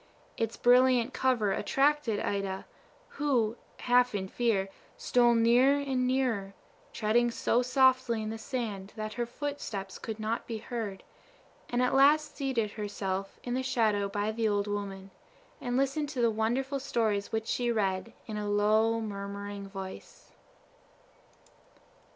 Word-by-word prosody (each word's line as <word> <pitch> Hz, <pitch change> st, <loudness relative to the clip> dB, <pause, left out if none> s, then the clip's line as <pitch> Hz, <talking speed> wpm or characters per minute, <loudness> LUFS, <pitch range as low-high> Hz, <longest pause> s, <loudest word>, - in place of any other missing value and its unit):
Its 225 Hz, 0 st, -2 dB
brilliant 250 Hz, 0 st, +4 dB
cover 240 Hz, -6 st, +1 dB
attracted 275 Hz, -3 st, +1 dB
Ida, 195 Hz, -1 st, -2 dB, 0.4 s
who, 245 Hz, -7 st, 0 dB, 0.3 s
half 245 Hz, -2 st, +3 dB
in 190 Hz, -1 st, -2 dB
fear, 210 Hz, -3 st, 0 dB, 0.3 s
stole 240 Hz, -1 st, +3 dB
nearer 245 Hz, +5 st, +5 dB
and 260 Hz, -3 st, 0 dB
nearer, 235 Hz, -7 st, 0 dB, 0.4 s
treading 235 Hz, +2 st, +2 dB
so 235 Hz, +1 st, +1 dB
softly 255 Hz, -3 st, +3 dB
in 215 Hz, -, -3 dB
the 225 Hz, -, -5 dB
sand 220 Hz, -6 st, -4 dB
that 215 Hz, -1 st, -4 dB
her 240 Hz, 0 st, -2 dB
foot 290 Hz, +4 st, -5 dB
steps 195 Hz, -3 st, -6 dB
could 220 Hz, -1 st, -6 dB
not 220 Hz, +2 st, -2 dB
be 230 Hz, -, -3 dB
heard, 220 Hz, -4 st, -5 dB, 0.7 s
and 245 Hz, +1 st, +1 dB
at 250 Hz, -, +1 dB
last 295 Hz, +3 st, +4 dB
seated 255 Hz, -7 st, -1 dB
herself 195 Hz, -2 st, -4 dB
in 245 Hz, -, -3 dB
the 260 Hz, -, 0 dB
shadow 215 Hz, -6 st, +1 dB
by 205 Hz, +2 st, -1 dB
the 225 Hz, 0 st, 0 dB
old 205 Hz, -1 st, +1 dB
woman, 195 Hz, -2 st, -5 dB, 0.5 s
and 245 Hz, -1 st, -1 dB
listened 275 Hz, +2 st, 0 dB
to 280 Hz, -4 st, -5 dB
the 235 Hz, -1 st, +3 dB
wonderful 250 Hz, +6 st, -1 dB
stories 220 Hz, -6 st, -1 dB
which 220 Hz, 0 st, -1 dB
she 240 Hz, +1 st, 0 dB
read, 200 Hz, -1 st, -1 dB
in 215 Hz, -2 st, -5 dB
a 210 Hz, -1 st, -3 dB
low, 215 Hz, +2 st, +3 dB
murmuring 200 Hz, -1 st, -5 dB
voice. 190 Hz, -1 st, -9 dB
225 Hz, 145 wpm, -30 LUFS, 205-250 Hz, 0.7 s, nearer